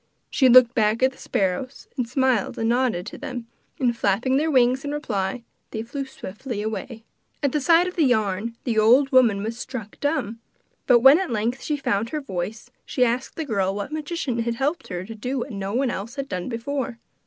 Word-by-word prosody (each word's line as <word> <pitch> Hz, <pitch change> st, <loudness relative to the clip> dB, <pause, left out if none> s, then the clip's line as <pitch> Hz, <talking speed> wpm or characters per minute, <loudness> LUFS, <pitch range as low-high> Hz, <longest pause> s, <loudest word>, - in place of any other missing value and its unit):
She 260 Hz, -2 st, +4 dB
looked 245 Hz, -1 st, +8 dB
back 220 Hz, +2 st, +2 dB
at 260 Hz, -, +5 dB
the 265 Hz, -, -19 dB
sparrows 195 Hz, +8 st, -2 dB
and 245 Hz, -3 st, -2 dB
smiled 260 Hz, -5 st, +1 dB
and 225 Hz, -, 0 dB
nodded 235 Hz, -7 st, +1 dB
to -, -, -8 dB
them, 250 Hz, -5 st, -5 dB, 0.3 s
and 245 Hz, -3 st, +2 dB
flapping 230 Hz, +5 st, +1 dB
their 315 Hz, +3 st, +1 dB
wings 255 Hz, -2 st, +3 dB
in 285 Hz, -, -3 dB
reply 230 Hz, -6 st, -2 dB, 0.3 s
they 220 Hz, -, -4 dB
flew 275 Hz, +4 st, -5 dB
swiftly 215 Hz, -1 st, -6 dB
away. 220 Hz, +1 st, -5 dB, 0.4 s
At 280 Hz, -, +2 dB
the 300 Hz, -, 0 dB
sight 335 Hz, +4 st, +5 dB
of 365 Hz, -, -5 dB
the 330 Hz, -, +3 dB
yarn 220 Hz, -2 st, 0 dB
the 230 Hz, -4 st, +1 dB
old 255 Hz, +6 st, +5 dB
woman 230 Hz, -7 st, +4 dB
was 230 Hz, +2 st, -4 dB
struck 235 Hz, -5 st, -7 dB
dumb; 260 Hz, -7 st, -1 dB, 0.5 s
but 240 Hz, -2 st, +6 dB
when 270 Hz, +6 st, +8 dB
at 380 Hz, -, -2 dB
length 235 Hz, +3 st, -1 dB
she 300 Hz, -, -1 dB
found 225 Hz, -5 st, -1 dB
her 305 Hz, -, -2 dB
voice 205 Hz, -4 st, -5 dB
she 250 Hz, -, +1 dB
asked 245 Hz, +2 st, -2 dB
the 320 Hz, -, -3 dB
girl 195 Hz, -6 st, 0 dB
what 205 Hz, +7 st, -4 dB
magician 305 Hz, -5 st, -3 dB
had 230 Hz, 0 st, -1 dB
helped 290 Hz, +7 st, -1 dB
her 180 Hz, -1 st, -5 dB
to 225 Hz, -, -8 dB
do 250 Hz, +5 st, -4 dB
what 255 Hz, +2 st, -4 dB
no 200 Hz, 0 st, -4 dB
one 265 Hz, +1 st, +1 dB
had 240 Hz, +8 st, -5 dB
done 180 Hz, -1 st, -4 dB
before. 250 Hz, +1 st, -3 dB
240 Hz, 205 wpm, -24 LUFS, 215-270 Hz, 0.5 s, looked